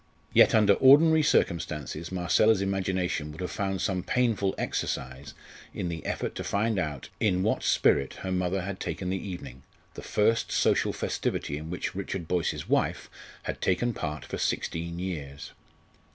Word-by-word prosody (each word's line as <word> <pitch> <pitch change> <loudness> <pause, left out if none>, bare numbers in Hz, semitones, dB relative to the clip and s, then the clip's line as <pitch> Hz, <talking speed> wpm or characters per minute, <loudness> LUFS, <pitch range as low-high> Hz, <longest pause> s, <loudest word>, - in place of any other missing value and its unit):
Yet - - +6
under 105 -2 +6
ordinary 155 +7 +6
circumstances 80 - 0
Marcella's 95 +4 +3
imagination 95 -5 -1
would 80 - -9
have 90 - -3
found 95 -3 -2
some 95 -2 0
painful 110 -2 +1
exercise 65 +2 -3 0.4
in 90 - -2
the 80 -2 -5
effort - - -2
to - - -3
find 105 0 0
out 75 -6 -4
in 95 -4 +2
what 110 - +1
spirit 70 - +2
her 95 - -2
mother 90 +1 0
had 100 0 -5
taken 90 -1 -3
the 95 +1 -3
evening 65 -8 -8 0.3
the - - -8
first 115 +2 +1
social - - +2
festivity 70 - -2
in 80 +2 -6
which 90 - -3
Richard 95 -3 -4
Boyce's 90 -1 -1
wife - - 0 0.3
had - - -5
taken 120 +6 +1
part 75 - -4
for - - -5
sixteen 85 +1 -2
years. 75 -7 -5
90 Hz, 155 wpm, -28 LUFS, 80-100 Hz, 0.4 s, Yet